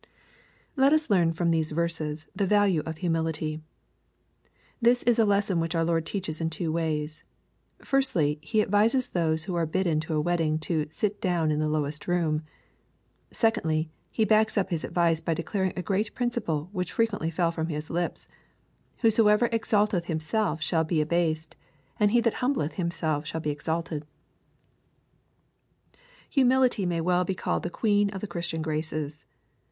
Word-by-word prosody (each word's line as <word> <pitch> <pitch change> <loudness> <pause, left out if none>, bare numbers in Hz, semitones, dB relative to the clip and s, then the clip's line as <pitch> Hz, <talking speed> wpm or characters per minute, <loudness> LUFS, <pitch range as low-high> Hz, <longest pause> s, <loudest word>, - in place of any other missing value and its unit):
Let 275 +1 +4
us 310 -6 +1
learn 175 -4 +4
from 170 +1 0
these 160 -1 +1
verses 155 -1 -2
the 200 - 0
value 205 -5 +3
of 160 -1 -4
humility. 160 -2 -1 1.2
This 240 +1 +4
is 240 -1 +3
a 225 - +5
lesson 200 -3 +2
which 165 +1 -1
our 165 - +2
Lord 165 -1 0
teaches 170 -6 -4
in 160 - 0
two 160 0 -3
ways. 155 -2 -2 0.6
Firstly, 170 - +1
He 215 +8 +1
advises 225 +6 +2
those 160 -2 0
who 180 - -4
are 170 -2 0
bidden 170 -2 +1
to 160 0 -3
a - - +2
wedding 165 -1 +1
to 155 -1 -1
" - - -25
sit 205 +6 -2
down 175 -6 +1
in 150 - 0
the 155 0 0
lowest 150 -1 -2
room.'* 165 -4 +1 0.9
Secondly, 165 -9 0 0.2
He 220 - +1
backs 215 +1 +3
up 195 -1 +1
His 165 -3 -1
advice 170 -2 +1
by 165 0 -1
declaring 190 +3 -1
a 180 - -2
great 205 +3 -1
principle, 210 - -2
which 180 -4 -3
frequently 210 -8 0
fell 170 0 +1
from 160 -1 -3
His 150 -1 -5
lips: 175 +1 -2 0.2
— - - -40
" - - -39
Whosoever 225 0 +4
exalteth 210 -5 +1
himself 160 +1 -1
shall 160 0 +1
be 160 0 0
abased, 160 0 0 0.4
and 210 - +4
he 235 +3 +3
that 230 -1 +1
humbleth 250 - 0
himself 160 -4 -2
shall 160 - -3
be 150 - -1
exalted." 155 0 -3 2.2
Humility 255 -7 +3
may 170 -1 0
well 180 +2 +2
be 185 +1 -2
called - - -1
the 175 - -3
queen 205 +2 +2
of 195 -1 -6
the - - -3
Christian 170 -3 -3
graces. 155 -1 -3
170 Hz, 170 wpm, -27 LUFS, 160-205 Hz, 2.2 s, a